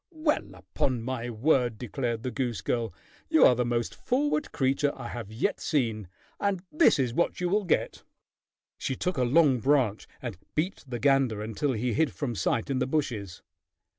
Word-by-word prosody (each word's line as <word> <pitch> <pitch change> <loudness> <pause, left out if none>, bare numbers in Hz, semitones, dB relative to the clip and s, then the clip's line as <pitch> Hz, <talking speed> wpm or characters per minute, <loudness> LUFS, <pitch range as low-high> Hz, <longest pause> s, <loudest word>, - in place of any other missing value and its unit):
"Well, 310 -3 -1
upon 125 -4 -2
my 120 -1 -3
word!" 120 -1 +2
declared 120 0 -3
the 130 - -2
goose 120 -8 -2
girl. 115 +3 -1 0.4
"You 320 -1 +6
are - - +7
the 125 0 0
most 120 -1 -1
forward 290 +4 0
creature 135 +1 +1
I 120 -3 -7
have 115 -4 -6
yet 110 - -1
seen, 115 - -1 0.3
and 195 -3 0
this 315 +1 +5
is 125 -4 0
what 170 - 0
you 180 - 0
will 205 +2 +1
get." 170 - 0 0.8
She 130 - -2
took 180 +6 -2
a 130 - +2
long 135 0 +4
branch 125 -4 +2
and 115 -8 -6 0.2
beat 175 +6 -1
the 125 -2 -4
gander 130 -5 +2
until 115 +6 -1
he 120 +1 -1
hid 160 +4 +1
from 135 -5 -3
sight 110 +6 0
in 130 - 0
the 130 - 0
bushes. 115 - -2
130 Hz, 180 wpm, -28 LUFS, 115-150 Hz, 0.8 s, are